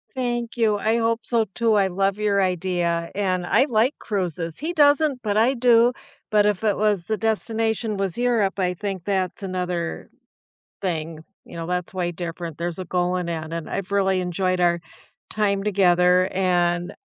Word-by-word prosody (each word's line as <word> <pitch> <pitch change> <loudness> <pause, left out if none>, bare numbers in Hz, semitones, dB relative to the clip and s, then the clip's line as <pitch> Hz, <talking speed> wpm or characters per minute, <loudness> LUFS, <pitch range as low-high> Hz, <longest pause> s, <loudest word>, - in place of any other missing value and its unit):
Thank 240 -2 -2
you, 215 -3 +2
I 220 +3 +1
hope 230 0 0
so 230 -2 +1
too. 230 -2 +2
I 195 -2 +3
love 195 +2 0
your 205 -2 +1
idea, 175 -2 -1
and 185 -3 -1
I 265 - +3
like 230 +5 +2
cruises. 175 -5 -3
He 320 +5 -3
doesn't, 290 -3 +3
but 210 -1 -1
I 235 +4 +4
do. 240 -1 +4 0.4
But 210 -1 +4
if 210 0 0
it 210 -3 +2
was 205 -5 +1
the 220 -1 -1
destination 225 0 -1
was 195 -3 -2
Europe, 230 -5 +1
I 180 -1 +1
think 195 -1 -5
that's 190 -1 -1
another 180 -2 -3 0.7
thing, 160 -4 -3 0.2
you - - -12
know, 165 -1 -5
that's 180 0 -3
way 175 -2 -1
different. 170 -2 -6
There's 170 +1 -4
a 185 - -4
goal 180 +1 0
in 180 -1 -3
that, 160 -1 -4
and 165 -1 -5
I've 195 0 -4
really 190 -2 +2
enjoyed 185 +1 -1
our 175 -1 +3 0.5
time 200 -2 0
together, 180 -2 +3
and 175 -2 +1
190 Hz, 175 wpm, -23 LUFS, 175-220 Hz, 0.7 s, I